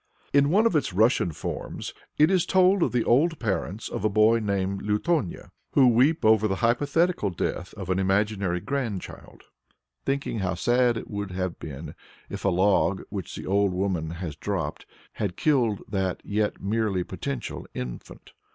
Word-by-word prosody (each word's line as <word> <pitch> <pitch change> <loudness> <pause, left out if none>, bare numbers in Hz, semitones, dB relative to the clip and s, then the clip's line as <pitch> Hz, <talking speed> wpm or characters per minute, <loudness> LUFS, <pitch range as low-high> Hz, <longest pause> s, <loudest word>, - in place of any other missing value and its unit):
In 140 0 +5
one 205 +7 +4
of 230 - +2
its 145 -10 +1
Russian 110 -3 +3
forms, - - -5 0.2
it 155 +4 +5
is 185 -3 +2
told 190 0 +4
of - - +2
the 120 -2 +1
old 160 +7 +3
parents 105 -2 -2
of - - -5
a 110 - +3
boy 110 +2 +4
named 100 -2 -1
Lutonya, 105 - -1 0.2
who 135 -2 +6
weep 130 +6 +3
over 110 -1 +5
the 95 - -1
hypothetical 145 - +2
death 90 0 -3
of 95 -3 -4
an 95 - +1
imaginary 95 -1 +1
grandchild, 120 -8 -5 0.6
thinking 135 -4 -2
how 95 -1 -1
sad 120 +5 +2
it - - -6
would 100 -1 -3
have 90 -1 -3
been 75 +1 -7 0.4
if - - -6
a 100 - +3
log 95 0 +2
which 95 -4 -5
the - - -7
old 100 0 +2
woman 90 -4 -1
has 85 -2 -5
dropped 80 -3 -4 0.2
had 100 -5 -3
killed 120 - +1
that 95 -3 -1
as - - -10
yet 105 0 0
merely 100 -2 0
potential 125 +8 -5
infant. 60 -1 -7
105 Hz, 170 wpm, -26 LUFS, 95-125 Hz, 0.6 s, who